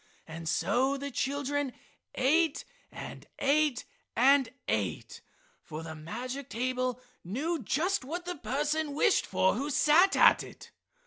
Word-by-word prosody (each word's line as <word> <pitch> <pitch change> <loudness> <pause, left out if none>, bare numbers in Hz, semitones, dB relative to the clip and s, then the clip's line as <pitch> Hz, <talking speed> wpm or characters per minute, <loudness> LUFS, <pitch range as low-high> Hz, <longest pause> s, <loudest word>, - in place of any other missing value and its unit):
And 165 0 -6
so 265 +9 +1
the 280 +1 -5
children 285 0 -1 0.4
ate 310 +4 +2 0.3
and - - -9
ate 285 -2 +2 0.3
and 265 +1 +5 0.2
ate, 100 -4 -2 0.4
for 155 +1 -8
the 160 -1 -7
magic 245 - -6
table 255 +1 -1 0.2
knew 285 - -2
just 320 - 0
what 345 +7 -5
the 360 -1 -4
person 295 +2 -1
wished 405 +6 +3
for 190 0 +2
who 275 +7 -3
sat 325 +6 +4
at - - +6
it. - - -12
275 Hz, 130 wpm, -30 LUFS, 240-300 Hz, 0.4 s, at